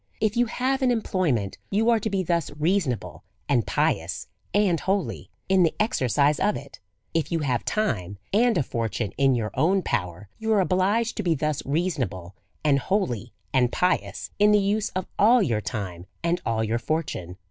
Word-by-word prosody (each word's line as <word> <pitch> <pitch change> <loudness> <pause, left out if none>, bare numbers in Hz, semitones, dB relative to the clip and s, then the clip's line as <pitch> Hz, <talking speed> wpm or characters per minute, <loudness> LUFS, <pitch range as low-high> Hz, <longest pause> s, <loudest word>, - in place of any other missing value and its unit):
If 215 0 +1
you 240 0 +3
have 260 +3 -1
an 260 - +3
employment^ 180 - 0
you 220 +4 +3
are 230 - +3
to 220 - -2
be 195 -2 0
thus 170 -3 0
reasonable, 130 - -1 0.2
and 120 -8 +2
pious 85 0 0 0.3
and 200 -5 +2
holy, 195 0 -2 0.2
in 190 -1 +4
the 165 -3 +3
exercise 145 - +2
of 210 - +2
it; 140 -1 -11 0.3
if 165 -1 0
you 165 -1 0
have 125 -5 0
time, 100 - -1 0.2
and 235 +1 +4
a 150 - +2
fortune 115 -3 -2
in 135 -2 +4
your 110 -3 -2
own 180 +8 +2
power^ 90 +2 -2
you 220 0 -1
are 210 - +4
obliged 195 +5 +1
to - - 0
be 170 -3 +2
thus 150 0 -1
reasonable, 135 - -2 0.3
and 145 -2 +3
holy 125 - -1 0.2
and 125 -2 +3
pious, 180 0 -1
in 210 +1 +6
the 210 - +6
use 205 +2 0
of 185 - -1
all 230 +3 +6
your 115 - 0
time, 95 -6 -5 0.2
and 170 +1 +1
all 110 -1 +1
your 115 +2 0
fortune. 115 - -3
160 Hz, 180 wpm, -25 LUFS, -, 0.3 s, in